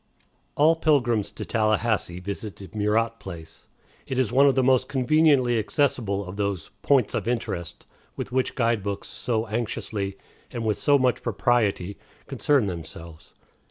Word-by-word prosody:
All 155 Hz, +3 st, +5 dB
pilgrims 125 Hz, -10 st, +2 dB
to -, -, -6 dB
Tallahassee 110 Hz, -4 st, 0 dB
visit 100 Hz, +2 st, -5 dB
the 95 Hz, -, -12 dB
Murat 110 Hz, +2 st, 0 dB
place. 80 Hz, -4 st, -10 dB, 0.4 s
It 130 Hz, -, -3 dB
is 130 Hz, -5 st, +1 dB
one 140 Hz, +2 st, +5 dB
of 135 Hz, -, +3 dB
the 130 Hz, -, +3 dB
most 130 Hz, 0 st, +3 dB
conveniently 135 Hz, -3 st, +3 dB
accessible 110 Hz, -5 st, 0 dB
of 90 Hz, +2 st, -8 dB
those 100 Hz, -5 st, -2 dB
"points 135 Hz, -6 st, +3 dB
of -, -, -2 dB
interest" 110 Hz, -8 st, -3 dB, 0.3 s
with -, -, -5 dB
which 130 Hz, 0 st, 0 dB
guide 115 Hz, -3 st, +1 dB
books 100 Hz, 0 st, -4 dB
so 115 Hz, -2 st, -2 dB
anxiously, 105 Hz, -3 st, -3 dB, 0.3 s
and 115 Hz, -2 st, -5 dB
with 105 Hz, -2 st, 0 dB
so 140 Hz, +8 st, +4 dB
much 130 Hz, -2 st, +1 dB
propriety, 105 Hz, -4 st, 0 dB, 0.3 s
concern 140 Hz, -6 st, +2 dB
themselves. 85 Hz, -2 st, -8 dB
115 Hz, 150 wpm, -25 LUFS, 100-130 Hz, 0.4 s, All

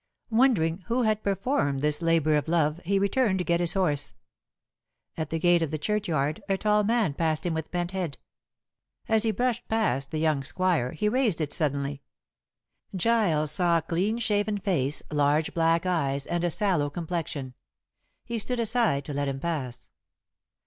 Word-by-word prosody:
Wondering 220 Hz, -9 st, +3 dB
who 240 Hz, +1 st, +1 dB
had 215 Hz, -1 st, +1 dB
performed 195 Hz, -, 0 dB
this 150 Hz, +1 st, 0 dB
labor 165 Hz, -2 st, +2 dB
of 150 Hz, -, 0 dB
love, 160 Hz, 0 st, +1 dB
he 195 Hz, +3 st, +1 dB
returned 200 Hz, +1 st, +2 dB
to 180 Hz, -, -2 dB
get 170 Hz, -1 st, +1 dB
his 175 Hz, -1 st, +1 dB
horse. 150 Hz, -, 0 dB, 1.0 s
At 160 Hz, -2 st, -4 dB
the 165 Hz, -, -1 dB
gate 175 Hz, +1 st, +3 dB
of 165 Hz, -, 0 dB
the 155 Hz, -, -3 dB
churchyard 160 Hz, -3 st, -1 dB
a 195 Hz, -, +2 dB
tall 210 Hz, +1 st, +2 dB
man 220 Hz, -6 st, +1 dB
passed 160 Hz, +1 st, -1 dB
him 175 Hz, -, 0 dB
with 160 Hz, -1 st, -4 dB
bent 175 Hz, 0 st, -2 dB
head. 180 Hz, -6 st, -3 dB, 0.9 s
As 220 Hz, -1 st, +3 dB
he 225 Hz, -, +2 dB
brushed 245 Hz, +1 st, -1 dB
past 140 Hz, -, 0 dB
the 155 Hz, -, -4 dB
young 155 Hz, -3 st, +1 dB
squire 170 Hz, -5 st, 0 dB
he 210 Hz, +7 st, -1 dB
raised 225 Hz, -6 st, +1 dB
it 150 Hz, -2 st, -2 dB
suddenly. 140 Hz, -2 st, -1 dB, 0.9 s
Giles 180 Hz, -8 st, +2 dB
saw 170 Hz, +1 st, +2 dB
a -, -, 0 dB
clean 190 Hz, +9 st, 0 dB
shaven 210 Hz, -2 st, 0 dB
face, 160 Hz, -9 st, 0 dB
large 150 Hz, +1 st, +1 dB
black 165 Hz, +1 st, +2 dB
eyes, 140 Hz, -6 st, 0 dB
and 175 Hz, 0 st, -2 dB
a 175 Hz, -, +2 dB
sallow 175 Hz, -6 st, +1 dB
complexion. 155 Hz, -5 st, -4 dB, 0.7 s
He 235 Hz, -1 st, -3 dB
stood 245 Hz, +3 st, 0 dB
aside 225 Hz, -, +1 dB
to 145 Hz, -, -5 dB
let 145 Hz, 0 st, -1 dB
him 135 Hz, 0 st, -3 dB
pass. 135 Hz, -6 st, -4 dB
170 Hz, 170 wpm, -27 LUFS, 150-210 Hz, 1.0 s, Wondering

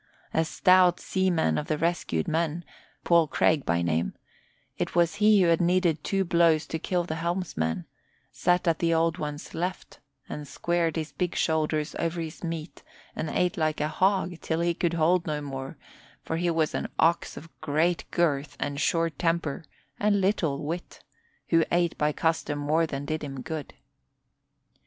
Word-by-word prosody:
A 160 Hz, -, +3 dB
stout 180 Hz, +2 st, +4 dB
seaman 175 Hz, -, +1 dB
of 150 Hz, -, -5 dB
the 155 Hz, -, 0 dB
rescued 160 Hz, -, -1 dB
men, 165 Hz, +1 st, -1 dB, 0.4 s
Paul 170 Hz, -2 st, +4 dB
Craig 155 Hz, -1 st, +2 dB
by 85 Hz, +1 st, +1 dB
name 85 Hz, -1 st, 0 dB, 0.6 s
it -, -, -2 dB
was 170 Hz, -1 st, +3 dB
he 210 Hz, -2 st, +6 dB
who 170 Hz, -, +3 dB
had 165 Hz, +1 st, +3 dB
needed 175 Hz, -3 st, +2 dB
two 195 Hz, -1 st, 0 dB
blows 170 Hz, -2 st, +3 dB
to 160 Hz, -, -1 dB
kill 180 Hz, +2 st, 0 dB
the 170 Hz, -, -4 dB
helmsman 165 Hz, -, -2 dB, 0.5 s
sat 175 Hz, +7 st, +1 dB
at 165 Hz, -1 st, +2 dB
the 165 Hz, -1 st, +2 dB
Old 165 Hz, +1 st, +1 dB
One's 150 Hz, 0 st, -5 dB
left 180 Hz, +2 st, -4 dB, 0.3 s
and 150 Hz, -1 st, -6 dB
squared 170 Hz, 0 st, 0 dB
his 160 Hz, -1 st, -3 dB
big 180 Hz, -1 st, -2 dB
shoulders 155 Hz, -1 st, 0 dB
over 170 Hz, +1 st, -1 dB
his 160 Hz, +1 st, -6 dB
meat 165 Hz, -1 st, -5 dB, 0.3 s
and 160 Hz, -, -3 dB
ate 180 Hz, +2 st, 0 dB
like 155 Hz, -1 st, 0 dB
a 150 Hz, 0 st, 0 dB
hog 185 Hz, 0 st, +1 dB
till 160 Hz, 0 st, -1 dB
he 170 Hz, 0 st, +2 dB
could 170 Hz, 0 st, -1 dB
hold 170 Hz, +2 st, +2 dB
no 150 Hz, -1 st, -1 dB
more, 135 Hz, -2 st, -6 dB, 0.5 s
for 160 Hz, -, -2 dB
he 175 Hz, +1 st, +1 dB
was 160 Hz, -2 st, +1 dB
an -, -, -2 dB
ox 170 Hz, +1 st, +2 dB
of 165 Hz, -, -9 dB
great 160 Hz, +4 st, +1 dB
girth 145 Hz, -5 st, 0 dB
and 145 Hz, 0 st, -2 dB
short 165 Hz, -1 st, 0 dB
temper 165 Hz, -3 st, -1 dB, 0.3 s
and 205 Hz, -1 st, +3 dB
little 170 Hz, -8 st, 0 dB
wit, 170 Hz, +4 st, -6 dB, 0.5 s
who 165 Hz, -1 st, +4 dB
ate 175 Hz, -1 st, +2 dB
by 150 Hz, 0 st, +2 dB
custom 160 Hz, -1 st, -1 dB
more 155 Hz, +3 st, +1 dB
than 140 Hz, -1 st, -5 dB
did 155 Hz, +1 st, -3 dB
him 135 Hz, -2 st, -5 dB
good. 160 Hz, -3 st, -6 dB
165 Hz, 170 wpm, -27 LUFS, 150-175 Hz, 0.6 s, he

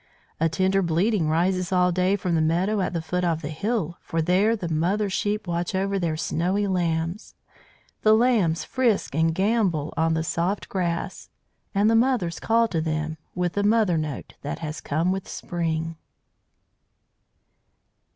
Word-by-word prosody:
"A 165 Hz, +1 st, +2 dB
tender 190 Hz, +4 st, +2 dB
bleating 175 Hz, +1 st, +1 dB
rises 180 Hz, +3 st, +1 dB
all 180 Hz, -1 st, +3 dB
day 185 Hz, +2 st, +2 dB
from 180 Hz, -3 st, -2 dB
the 160 Hz, -, +2 dB
meadow 180 Hz, +6 st, +1 dB
at -, -, -1 dB
the 170 Hz, -2 st, -3 dB
foot 180 Hz, +2 st, -2 dB
of 165 Hz, -2 st, 0 dB
the 145 Hz, -, -3 dB
hill, 175 Hz, 0 st, -2 dB
for 165 Hz, -, -3 dB
there 185 Hz, +7 st, +3 dB
the 195 Hz, -6 st, -4 dB
mother 185 Hz, +6 st, 0 dB
sheep 205 Hz, +2 st, -1 dB
watch 175 Hz, +1 st, -2 dB
over 195 Hz, +1 st, 0 dB
their 165 Hz, -3 st, -1 dB
snowy 180 Hz, +5 st, 0 dB
lambs. 170 Hz, 0 st, -1 dB, 0.7 s
The 215 Hz, 0 st, +6 dB
lambs 220 Hz, -9 st, +2 dB
frisk 240 Hz, -, 0 dB
and 160 Hz, +2 st, +2 dB
gambol 190 Hz, -5 st, 0 dB
on 160 Hz, 0 st, +2 dB
the 160 Hz, -, 0 dB
soft 175 Hz, +5 st, -2 dB
grass, 180 Hz, 0 st, -3 dB, 0.5 s
and 200 Hz, +2 st, +3 dB
the 225 Hz, -, +4 dB
mothers 225 Hz, -8 st, +1 dB
call 230 Hz, +1 st, +3 dB
to 165 Hz, -4 st, -1 dB
them 155 Hz, 0 st, -2 dB, 0.2 s
with 180 Hz, -1 st, -1 dB
the 205 Hz, -, 0 dB
mother 210 Hz, -4 st, +3 dB
note 155 Hz, -2 st, -5 dB
that 145 Hz, -, -4 dB
has 155 Hz, -1 st, -5 dB
come 165 Hz, +5 st, 0 dB
with 190 Hz, 0 st, -3 dB
the -, -, -13 dB
spring." 165 Hz, -1 st, -3 dB
180 Hz, 165 wpm, -25 LUFS, 165-200 Hz, 0.7 s, The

